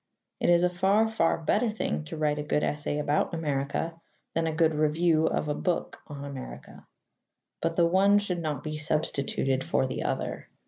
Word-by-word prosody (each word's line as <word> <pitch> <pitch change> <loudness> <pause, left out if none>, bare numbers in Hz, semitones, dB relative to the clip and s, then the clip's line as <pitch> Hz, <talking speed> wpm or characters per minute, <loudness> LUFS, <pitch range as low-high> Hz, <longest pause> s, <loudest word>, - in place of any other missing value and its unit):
It - - +1
is 175 0 +5
a 180 - +4
far, 195 +5 +3
far 220 -7 +1
better 210 +8 +1
thing 75 - -2
to 75 - -7
write 150 -1 0
a - - -2
good 150 0 0
essay 145 0 -1
about 150 +3 0
America 155 +2 -2 0.3
than 165 0 0
a - - 0
good 160 0 +2
review 155 +1 +2
of - - -1
a 150 - 0
book 175 +3 -2
on 145 -2 -7
America. 140 -2 -9 0.7
But 165 0 -1
the 170 - +4
one 195 +4 +4
should 195 -4 -1
not 150 -4 -3
be 155 0 -4
substituted 140 -3 0
for - - +1
the 130 - -3
other. - - -3
155 Hz, 185 wpm, -28 LUFS, 150-175 Hz, 0.7 s, is